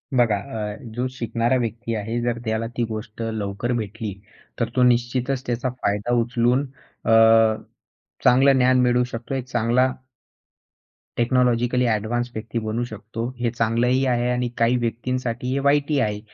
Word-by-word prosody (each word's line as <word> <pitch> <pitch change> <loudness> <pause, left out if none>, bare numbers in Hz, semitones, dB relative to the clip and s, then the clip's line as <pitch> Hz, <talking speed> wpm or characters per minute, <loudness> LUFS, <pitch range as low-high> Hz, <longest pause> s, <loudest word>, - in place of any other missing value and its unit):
बघा, 120 -4 +4
अ, 105 -2 -5 0.2
जो 125 +1 -1
शिकणारा 115 0 0
व्यक्ती 115 0 -3
आहे 110 +3 -2
जर 120 -1 -1
त्याला 110 +1 -1
ती 120 - +1
गोष्ट 110 0 -6
लवकर 110 0 -3
भेटली, 110 -1 -4 0.5
तर 115 -2 0
तो 125 - +4
निश्चितच 125 +2 +1
त्याचा 120 +2 -1
फायदा 120 -2 -1
उचलून 120 +3 +1 0.4
अ, 115 - +2 1.1
चांगलं 135 +3 +6
ज्ञान 130 0 +4
मिळवू 125 0 +3
शकतो. 120 +1 -6
एक 130 - -3
चांगला 120 +1 +2 1.3
टेक्नॉलॉजिकली 125 0 +2
ॲडव्हान्स 115 +3 -1
व्यक्ती 110 +2 -4
बनू 110 +3 -1
शकतो. 110 0 -7 0.2
हे 120 -1 +1
चांगलंही 120 +3 +1
आहे 120 -1 +1
आणि 125 0 -1
काही 115 +2 +3
व्यक्तींसाठी 125 +1 -2
हे 140 - 0
वाईटही 145 0 +2
आहे. 105 -3 0
120 Hz, 145 wpm, -23 LUFS, 115-125 Hz, 1.3 s, चांगलं